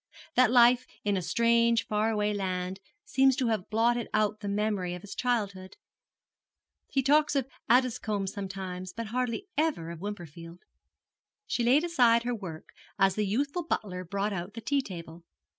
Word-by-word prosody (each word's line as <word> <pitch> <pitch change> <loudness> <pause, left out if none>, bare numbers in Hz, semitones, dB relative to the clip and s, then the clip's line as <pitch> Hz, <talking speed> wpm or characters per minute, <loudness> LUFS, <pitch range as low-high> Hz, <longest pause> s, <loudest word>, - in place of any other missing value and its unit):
That 255 -2 +5
life 245 0 +5 0.2
in 205 -1 +1
a 185 - 0
strange 235 +4 +3
far 215 +1 0
away 210 -1 0
land 185 -1 -3 0.3
seems 270 -10 +3
to 255 -3 0
have 215 -3 -2
blotted 235 +2 +1
out 215 0 +1
the 205 - -6
memory 200 -3 -1
of 180 - -10
his 205 - -8
childhood. 200 -6 -2 1.1
He 270 - 0
talks 295 +2 +3
of 270 -2 +1 0.2
Addiscomb 230 -5 +2
sometimes 185 -2 -5
but 230 -1 -5
hardly 250 - -1
ever 290 - 0
of 170 -1 -9
Wimperfield.' 170 -4 -8 0.8
She 240 - -1
laid 260 +6 +4
aside 245 -9 +4
her 245 0 -1
work 180 -8 -7 0.3
as 195 -1 +4
the 210 +1 -1
youthful 280 - -1
butler 185 - -3
brought 200 +3 -2
out 185 +2 -5
the 230 - -6
tea 280 +5 +1
table. 170 -6 -9
215 Hz, 160 wpm, -29 LUFS, 190-245 Hz, 1.1 s, That